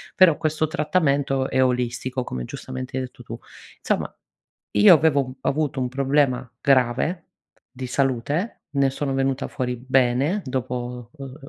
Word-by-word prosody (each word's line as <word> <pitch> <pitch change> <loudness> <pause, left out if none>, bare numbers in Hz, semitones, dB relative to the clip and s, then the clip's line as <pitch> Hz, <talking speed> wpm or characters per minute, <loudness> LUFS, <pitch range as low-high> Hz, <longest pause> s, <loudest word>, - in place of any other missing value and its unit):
però, 185 -5 +6
questo 155 0 0
trattamento 145 -5 +1
è 130 - +3
olistico, 125 +1 -1
come 65 - -4
giustamente 130 - -6
hai 130 - -1
detto 125 -1 -10
tu. 115 0 -8 0.4
Insomma, - - -1 0.6
io 205 -4 +9
avevo 140 -5 +2
avuto 145 -1 -1
un 125 - 0
problema 135 -2 +1
grave, 135 +6 +2 0.5
di 130 0 -6
salute 140 - -1
ne 140 -1 +2
sono 135 0 -3
venuta 135 0 0
fuori 125 -1 -3
bene, 130 - +1
dopo, 125 -2 -4
uhm, 135 -3 -9
135 Hz, 135 wpm, -23 LUFS, 125-145 Hz, 0.6 s, io